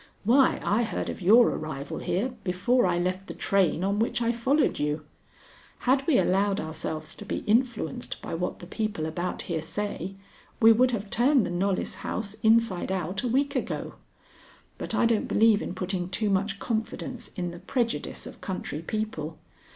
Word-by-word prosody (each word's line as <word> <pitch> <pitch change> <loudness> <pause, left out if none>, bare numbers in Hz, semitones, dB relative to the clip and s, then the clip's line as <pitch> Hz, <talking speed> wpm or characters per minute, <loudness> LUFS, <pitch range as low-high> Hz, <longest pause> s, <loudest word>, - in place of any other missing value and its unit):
Why, 255 +5 +4
I 210 +4 +2
heard 225 - -2
of - - -9
your 225 +7 +7
arrival 145 -3 -4
here 225 +9 -1
before 195 +6 +2
I 175 -1 +1
left 185 +2 -1
the - - -7
train 185 -3 +2
on 200 +2 +1
which 230 - +1
I 235 0 +2
followed 260 +6 +1
you. 150 +1 -1 0.8
Had 265 +2 +2
we 300 -6 +5
allowed 200 0 +2
ourselves 155 0 -4
to - - -10
be 210 - -4
influenced 230 - 0
by - - -6
what 175 +2 -2
the - - -10
people 210 -3 -2
about 175 +3 -3
here 165 -3 -2
say, 195 +1 -4 0.4
we 225 0 +8
would 250 +3 +5
have 210 -4 -3
turned 255 +1 +4
the - - -3
Knollys 185 +2 -1
house 210 -2 -3
inside 220 -5 +3
out 190 +1 -2
a 250 - -1
week 280 +4 +1
ago. 255 - -2 0.9
But - - -3
I - - +3
don't 230 -2 +2
believe 220 -1 +4
in 180 - -4
putting 185 -1 -2
too 205 +2 0
much 195 +1 0
confidence 225 +3 -4
in 175 -1 -3
the 170 - -9
prejudice 235 +5 -2
of - - -10
country 185 -5 -4
people. 165 -5 -3
200 Hz, 175 wpm, -27 LUFS, 180-230 Hz, 0.9 s, we